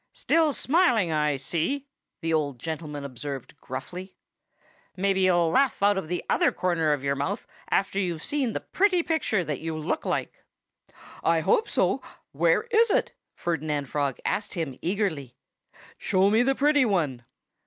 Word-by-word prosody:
"Still 320 Hz, -2 st, +2 dB
smiling, 260 Hz, -, +2 dB
I 150 Hz, -2 st, +1 dB
see," 170 Hz, -, -2 dB, 0.4 s
the 165 Hz, 0 st, -1 dB
old 145 Hz, -4 st, 0 dB
gentleman 150 Hz, 0 st, -5 dB
observed 135 Hz, 0 st, -6 dB
gruffly. 180 Hz, +9 st, -7 dB, 0.8 s
"Maybe 195 Hz, 0 st, +1 dB
you'll 175 Hz, -3 st, +3 dB
laugh 265 Hz, -4 st, +2 dB
out 205 Hz, 0 st, +5 dB
of 190 Hz, -5 st, -3 dB
the 180 Hz, +2 st, -2 dB
other -, -, +3 dB
corner 170 Hz, -4 st, +1 dB
of 145 Hz, -2 st, -1 dB
your 140 Hz, 0 st, +1 dB
mouth 140 Hz, +1 st, -3 dB, 0.2 s
after 195 Hz, 0 st, +1 dB
you've 175 Hz, -5 st, -2 dB
seen 270 Hz, -6 st, -1 dB
the -, -, -3 dB
pretty 370 Hz, -3 st, +2 dB
picture 225 Hz, -, 0 dB
that 150 Hz, -4 st, -3 dB
you 160 Hz, 0 st, -3 dB
look 155 Hz, -, -2 dB
like." -, -, -3 dB, 0.8 s
"I 165 Hz, -1 st, +3 dB
hope 435 Hz, -, +2 dB
so! -, -, +1 dB, 0.3 s
Where -, -, +2 dB
is 460 Hz, 0 st, +5 dB
it?" -, -, +1 dB, 0.2 s
Ferdinand 150 Hz, -4 st, -2 dB
Frog 140 Hz, -3 st, -1 dB
asked 205 Hz, -, -1 dB
him 160 Hz, -7 st, -3 dB
eagerly. 165 Hz, -, -2 dB, 0.6 s
"Show 190 Hz, +1 st, +2 dB
me 220 Hz, +2 st, +4 dB
the 270 Hz, +2 st, +2 dB
pretty 290 Hz, +1 st, +4 dB
one!" 155 Hz, -, 0 dB
175 Hz, 155 wpm, -26 LUFS, 150-220 Hz, 0.8 s, out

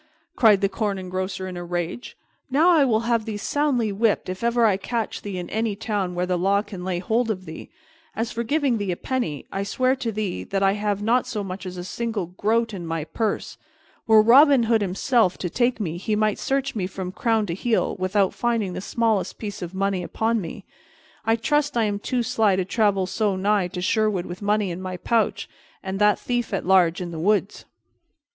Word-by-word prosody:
cried 215 Hz, -, +5 dB
the 200 Hz, -, +3 dB
Corn 205 Hz, -1 st, -2 dB
Engrosser 185 Hz, 0 st, -4 dB
in 185 Hz, -, -6 dB
a 175 Hz, -, -5 dB
rage. 175 Hz, +6 st, -4 dB, 0.3 s
"Now 300 Hz, +7 st, +4 dB
I 320 Hz, -4 st, +5 dB
will 225 Hz, -4 st, +2 dB
have 230 Hz, -1 st, 0 dB
thee 220 Hz, -2 st, -4 dB
soundly 250 Hz, -1 st, 0 dB
whipped 210 Hz, -1 st, +1 dB
if 185 Hz, +4 st, -5 dB
ever 235 Hz, 0 st, +3 dB
I 210 Hz, -3 st, +4 dB
catch 225 Hz, +3 st, -3 dB
thee 200 Hz, -2 st, -5 dB
in 180 Hz, -, -5 dB
any 220 Hz, -1 st, -1 dB
town 200 Hz, -4 st, -2 dB
where 180 Hz, +1 st, 0 dB
the 180 Hz, -1 st, -1 dB
law 200 Hz, +3 st, +2 dB
can 190 Hz, -5 st, -8 dB
lay 185 Hz, -1 st, -2 dB
hold 225 Hz, +6 st, 0 dB
of 185 Hz, -4 st, -3 dB
thee! 160 Hz, -1 st, -9 dB, 0.5 s
As 225 Hz, +1 st, -2 dB
for 230 Hz, -, -3 dB
giving 265 Hz, -1 st, +1 dB
thee 200 Hz, -2 st, -1 dB
a 175 Hz, -, -3 dB
penny, 240 Hz, -, -3 dB
I 195 Hz, -, -2 dB
swear 255 Hz, +6 st, +1 dB
to 235 Hz, -3 st, -2 dB
thee 210 Hz, -3 st, -3 dB
that 195 Hz, 0 st, -1 dB
I 195 Hz, -, +5 dB
have 205 Hz, 0 st, -1 dB
not 240 Hz, +3 st, +2 dB
so 220 Hz, -5 st, -3 dB
much 185 Hz, 0 st, -6 dB
as 185 Hz, 0 st, -7 dB
a 175 Hz, -, -5 dB
single 220 Hz, 0 st, -3 dB
groat 220 Hz, +6 st, 0 dB
in 185 Hz, -3 st, -5 dB
my 165 Hz, -1 st, -2 dB
purse. 215 Hz, +6 st, -3 dB, 0.5 s
Were 220 Hz, -1 st, +7 dB
Robin 270 Hz, +2 st, +7 dB
Hood 225 Hz, -1 st, +2 dB
himself 200 Hz, +1 st, +1 dB
to 180 Hz, -, -4 dB
take 245 Hz, -1 st, +1 dB
me, 170 Hz, -5 st, -3 dB
he 210 Hz, +4 st, -1 dB
might 215 Hz, -1 st, +1 dB
search 275 Hz, 0 st, -1 dB
me 190 Hz, -5 st, -2 dB
from 185 Hz, -1 st, -6 dB
crown 225 Hz, +1 st, +1 dB
to 170 Hz, -, -3 dB
heel 225 Hz, +5 st, 0 dB
without 190 Hz, +1 st, +1 dB
finding 230 Hz, -6 st, -1 dB
the -, -, -5 dB
smallest 220 Hz, -1 st, 0 dB
piece 205 Hz, -2 st, -6 dB
of 175 Hz, +1 st, -6 dB
money 195 Hz, -1 st, 0 dB
upon 225 Hz, +5 st, -1 dB
me. 185 Hz, +3 st, -8 dB, 0.6 s
I 225 Hz, +1 st, +3 dB
trust 290 Hz, +3 st, 0 dB
I 230 Hz, -, +3 dB
am 205 Hz, -1 st, -1 dB
too 245 Hz, +3 st, -1 dB
sly 215 Hz, -3 st, +2 dB
to 185 Hz, -1 st, -1 dB
travel 200 Hz, -2 st, +1 dB
so 205 Hz, +1 st, 0 dB
nigh 200 Hz, 0 st, +1 dB
to 180 Hz, 0 st, -6 dB
Sherwood 205 Hz, -2 st, +1 dB
with 180 Hz, +2 st, -8 dB
money 205 Hz, -2 st, +1 dB
in 175 Hz, +2 st, -6 dB
my 185 Hz, -1 st, -5 dB
pouch, 225 Hz, +5 st, 0 dB, 0.4 s
and 190 Hz, 0 st, -4 dB
that 210 Hz, 0 st, +4 dB
thief 240 Hz, -4 st, -2 dB
at -, -, -3 dB
large 185 Hz, -1 st, +4 dB
in 175 Hz, -1 st, -5 dB
the 165 Hz, -, -6 dB
woods." 205 Hz, +3 st, 0 dB
205 Hz, 215 wpm, -24 LUFS, 185-230 Hz, 0.6 s, Were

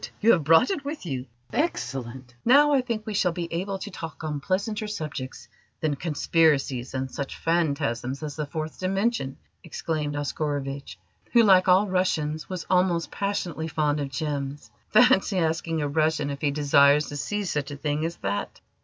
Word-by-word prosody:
you 225 Hz, +2 st, +5 dB
have 165 Hz, -8 st, +3 dB
brought 165 Hz, -, +5 dB
it 310 Hz, -8 st, -2 dB
with 290 Hz, -, -5 dB
you! 130 Hz, -5 st, -4 dB, 0.3 s
Excellent! 130 Hz, -, -3 dB
Now 290 Hz, +4 st, +6 dB
I 270 Hz, -, +4 dB
think 230 Hz, -4 st, -4 dB
we 215 Hz, -, -4 dB
shall 180 Hz, -3 st, +2 dB
be 170 Hz, -1 st, -3 dB
able 195 Hz, +3 st, -2 dB
to 205 Hz, +2 st, -7 dB
talk 165 Hz, -3 st, -8 dB
on 150 Hz, -2 st, -2 dB
pleasanter 205 Hz, +6 st, -1 dB
subjects 150 Hz, -9 st, -6 dB, 0.3 s
than 155 Hz, -2 st, 0 dB
conspiracies 145 Hz, -5 st, +1 dB
and 130 Hz, 0 st, -3 dB
such 140 Hz, -1 st, -5 dB
phantasms 140 Hz, -5 st, -1 dB
as 150 Hz, -2 st, -5 dB
the 150 Hz, -2 st, -3 dB
Fourth 155 Hz, +1 st, -5 dB
Dimension!" 195 Hz, -, -1 dB, 0.3 s
exclaimed 155 Hz, -3 st, -3 dB
Oscarovitch, 145 Hz, -1 st, -3 dB, 0.4 s
who, 235 Hz, -1 st, +7 dB
like 190 Hz, -3 st, +6 dB
all 190 Hz, +3 st, +5 dB
Russians, 160 Hz, -5 st, -1 dB
was 185 Hz, -2 st, -4 dB
almost 180 Hz, -4 st, +2 dB
passionately 180 Hz, -5 st, -2 dB
fond 150 Hz, -2 st, 0 dB
of 140 Hz, -1 st, -3 dB
gems. 145 Hz, -1 st, -4 dB, 0.2 s
"Fancy 230 Hz, -5 st, +4 dB
asking 160 Hz, -1 st, 0 dB
a -, -, 0 dB
Russian 155 Hz, -1 st, +1 dB
if 140 Hz, -, -6 dB
he 150 Hz, -, +2 dB
desires 145 Hz, 0 st, +4 dB
to 145 Hz, -, -6 dB
see 205 Hz, +8 st, -2 dB
such 150 Hz, -6 st, -2 dB
a 145 Hz, -, -6 dB
thing 150 Hz, +1 st, -1 dB
as 165 Hz, +1 st, -2 dB
that!" 100 Hz, +1 st, -2 dB
155 Hz, 170 wpm, -26 LUFS, 145-185 Hz, 0.4 s, who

